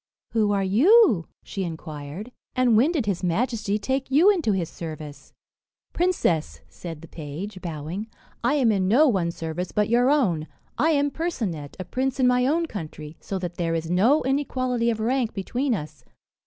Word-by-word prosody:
"Who 215 -2 +2
are 200 -1 +1
you?" 235 - +5 0.2
she 195 - -4
inquired; 160 - -7 0.2
"and 255 -3 +4
when 255 +9 +4
did 300 -10 -1
his 195 -4 -1
majesty 210 +3 0
take 265 +5 -2
you 320 +10 +6
into 335 - +1
his 185 -4 0
service?" 155 -3 -8 0.6
"Princess," 335 - 0
said 165 -3 -9
the - - -10
page, 170 +7 -7
bowing, 170 +5 -5 0.4
"I 240 +5 +2
am 255 -6 +3
in 190 -3 +1
no 265 +10 +5
one's 180 -8 0
service 165 +2 -4
but 210 0 +1
your 245 +2 +4
own. 185 - +2 0.3
I 320 - +2
am 285 -2 +2
Percinet, 215 - -3
a 185 - -4
prince 265 +4 -2
in 260 - +4
my 250 0 +3
own 330 +4 +2
country, 155 - -7
so 195 - -4
that 175 -2 -5
there 165 -1 0
is 165 0 -3
no 230 +12 +4
inequality 255 -3 0
of 225 -2 -1
rank 240 +1 0
between 245 +6 -1
us. 155 -4 -8
210 Hz, 175 wpm, -24 LUFS, 170-260 Hz, 0.6 s, you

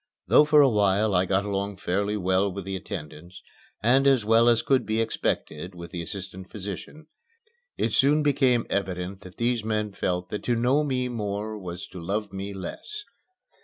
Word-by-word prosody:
Though 150 - +6
for 150 0 +6
a 140 - +7
while 105 -2 +2
I 90 0 +3
got 95 +2 +1
along 100 -1 -2
fairly 100 +3 -1
well 95 +1 +1
with 95 0 -6
the 95 0 -3
attendants 90 -2 -8 0.4
and 130 +5 +4
as 130 -6 +4
well 115 +2 +5
as 115 -1 +3
could 135 -2 +3
be 110 +1 -1
expected 90 -5 -2
with 85 0 -9
the 85 - -4
assistant 95 +2 -7
physician, 105 - -7 0.7
it - - 0
soon 150 +2 +4
became 130 -4 +3
evident 95 -1 -3
that 90 -2 -13
these 120 -1 0
men 105 -1 -1
felt 90 -2 -2
that 105 - -3
to 120 - +2
know 125 +6 +2
me 130 -3 -1
more 105 -2 -3
was 90 -4 -6
to 90 - -9
love 100 +4 -3
me 95 +1 -4
less. 100 - -7
100 Hz, 180 wpm, -26 LUFS, 95-120 Hz, 0.7 s, a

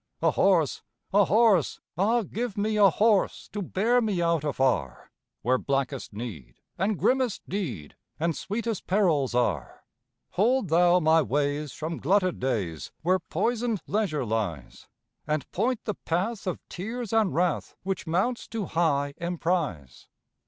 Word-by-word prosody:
A - - +4
horse! 175 -7 +2 0.3
A 200 0 +6
horse! 210 - +3 0.2
Ah, 220 +7 +2
give 225 +2 -4
me 215 +1 0
a 205 -2 +6
horse, 210 +3 +2
To 205 - -4
bear 225 +7 +2
me 210 -6 0
out 170 -3 +1
afar, 130 - -1 0.3
Where 125 +2 +2
blackest 135 -2 -2
need 100 - -7 0.2
and 195 +2 0
grimmest 255 -1 +1
deed, 130 - -4 0.2
And 165 0 0
sweetest 225 0 -3
perils 165 -10 +2
are. 125 0 -1 0.5
Hold 230 +1 +2
thou 175 +2 +5
my 160 -1 +4
ways 145 0 -1
from 160 +1 -4
glutted 185 +3 +2
days, 100 - -2
Where 185 +3 +3
poisoned 235 -1 -1
leisure 195 - -1
lies, 105 - -3 0.4
And 150 -1 -1
point 250 -1 0
the 210 - -1
path 195 +5 -2
of 185 - -2
tears 225 +4 -5
and 220 -5 +3
wrath 175 -2 0
Which 190 -2 -3
mounts 190 +9 0
to 225 -3 -3
high 145 -5 +1
emprise. 165 - -2
175 Hz, 140 wpm, -27 LUFS, 145-210 Hz, 0.5 s, A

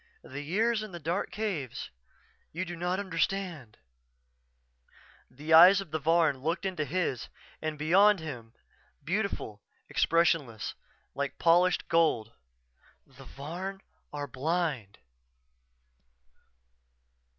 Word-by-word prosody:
The 145 - -7
years 215 +9 +1
in 215 -3 -8
the 175 - -6
dark 170 +5 -2
caves 185 - -4 0.6
you 180 +4 -3
do 175 0 -6
not 180 +2 -1
understand 180 - -2 1.6
_" - - -26
The 155 +3 -1
eyes 180 +4 +9
of 195 -6 -7
the 160 - -1
Varn 160 -2 +2
looked 165 +7 -2
into 180 -6 -2
his 160 -6 -2 0.3
and 155 -1 -3
beyond 190 +7 +5
him; 120 -8 -8 0.5
beautiful, 175 - -3 0.3
expressionless, 165 - +1 0.4
like 140 -1 -3
polished 175 +2 +3
gold. 155 -10 +2 0.8
"_The 135 -1 -15
Varn 180 +9 -6 0.3
are 145 -1 -4
blind. 140 - -2
165 Hz, 105 wpm, -29 LUFS, 140-185 Hz, 1.6 s, eyes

